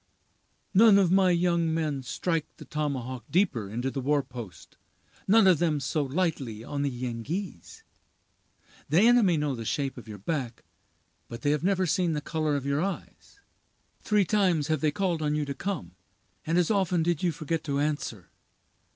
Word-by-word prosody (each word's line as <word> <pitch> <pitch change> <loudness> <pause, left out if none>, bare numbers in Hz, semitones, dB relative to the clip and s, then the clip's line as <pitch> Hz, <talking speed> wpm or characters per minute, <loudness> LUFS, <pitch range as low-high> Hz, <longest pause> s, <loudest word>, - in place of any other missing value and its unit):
None 210 +1 +7
of 190 -3 +3
my 190 -1 +4
young 170 -2 +2
men 155 -4 -1
strike 160 +4 -2
the - - -11
tomahawk 130 -5 -3
deeper 155 - +1
into 120 +5 -3
the 135 - -3
war 145 +2 +1
post—none 125 - -2
of 185 -5 +5
them 160 -4 +1
so 145 +3 -1
lightly 135 -7 -2
on 140 +3 -4
the 140 - +1
Yengeese. 125 - -5 1.1
The 160 +6 +4
enemy 225 -7 +5
know 150 -2 -1
the 115 -3 -5
shape 135 +3 -2
of 120 - -14
your 105 -1 -8
back, 125 - -4 0.6
but 115 +3 -9
they 145 - +2
have 150 +1 0
never 190 0 +2
seen 175 -1 +1
the 150 - -1
color 155 -1 -1
of 140 -1 -3
your 140 +1 0
eyes. 195 - -6 0.6
Three 210 -2 +2
times 180 -7 +1
have 155 -3 0
they 155 - +3
called 175 +1 -1
on 150 -1 0
you 150 -1 -1
to 140 - -4
come, 145 - -4 0.6
and 165 +2 +1
as 180 +3 +2
often 185 -5 +1
did 170 -2 0
you 180 - +1
forget 160 0 -3
to 140 -2 -1
answer. 145 - -3
155 Hz, 175 wpm, -27 LUFS, 135-180 Hz, 1.1 s, None